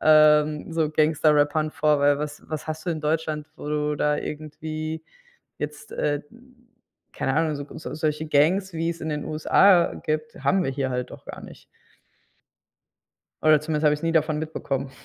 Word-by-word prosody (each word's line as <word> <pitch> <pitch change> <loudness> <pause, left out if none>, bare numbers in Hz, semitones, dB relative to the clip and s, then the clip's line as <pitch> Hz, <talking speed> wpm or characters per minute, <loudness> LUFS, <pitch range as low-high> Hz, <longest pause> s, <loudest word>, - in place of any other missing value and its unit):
ähm, 155 0 +4
so 160 -2 +1
Gangster-Rappern 155 0 +2
vor, 150 -2 +2
weil 145 0 +4
was 150 0 -5
was 155 -1 -5
hast 155 +1 -5
du - - +1
in 155 -2 -3
Deutschland, 155 0 -1
wo 150 - -7
du 150 0 0
da 150 0 +1
irgendwie 155 +1 -5 0.6
jetzt, 150 0 -6
äh, 145 -1 0
mhm 240 0 -21 0.5
keine 135 - -1
Ahnung, 160 0 +1
so 145 0 -6
so 155 - -7
solche 155 0 -1
Gangs, 170 +6 +2
wie's 165 +1 -3
in 160 - -2
den 150 -1 -3
USA 170 +3 +4
gibt, 155 0 -3
haben 185 +6 +3
wir - - 0
hier 135 0 -2
halt 125 -1 -3
auch - - -12
gar - - -8
nicht. - - -13 1.8
Oder 155 -1 +5
zumindest 155 0 -2
habe 150 - +5
ich's 150 - -7
nie 165 - +1
davon 155 -1 +2
mitbekommen. 140 -4 -3
155 Hz, 170 wpm, -24 LUFS, 150-160 Hz, 1.8 s, Oder